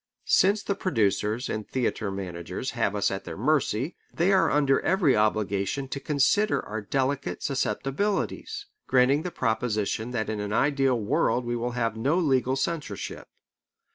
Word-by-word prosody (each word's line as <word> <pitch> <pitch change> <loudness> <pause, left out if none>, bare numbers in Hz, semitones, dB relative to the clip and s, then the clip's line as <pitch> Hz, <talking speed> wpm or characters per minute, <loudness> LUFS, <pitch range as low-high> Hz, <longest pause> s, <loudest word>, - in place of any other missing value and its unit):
Since 200 +2 +3
the 200 - 0
producers 110 - 0
and 110 -1 -4
theatre 115 -5 -1
managers 95 +5 -5
have 115 -4 0
us 100 - +1
at 95 - -4
their - - -7
mercy, 135 - +1 0.2
they 175 +4 +2
are 185 -4 +4
under 140 -2 +3
every 175 -7 +3
obligation 105 +4 0
to 140 - -4
consider 155 +10 +2
our 110 +1 -4
delicate 135 +5 -1
susceptibilities 195 - -1 0.2
granting 130 +3 +4
the 180 - -3
proposition 110 - -1
that 115 -3 -2
in 110 -1 -3
an 105 0 -3
ideal 135 -1 +2
world 120 +3 +1
we 120 0 -1
will 120 +1 -2
have 115 -2 0
no 140 +9 +1
legal 130 -6 +2
censorship. 140 - -4
125 Hz, 150 wpm, -26 LUFS, 110-145 Hz, 0.2 s, are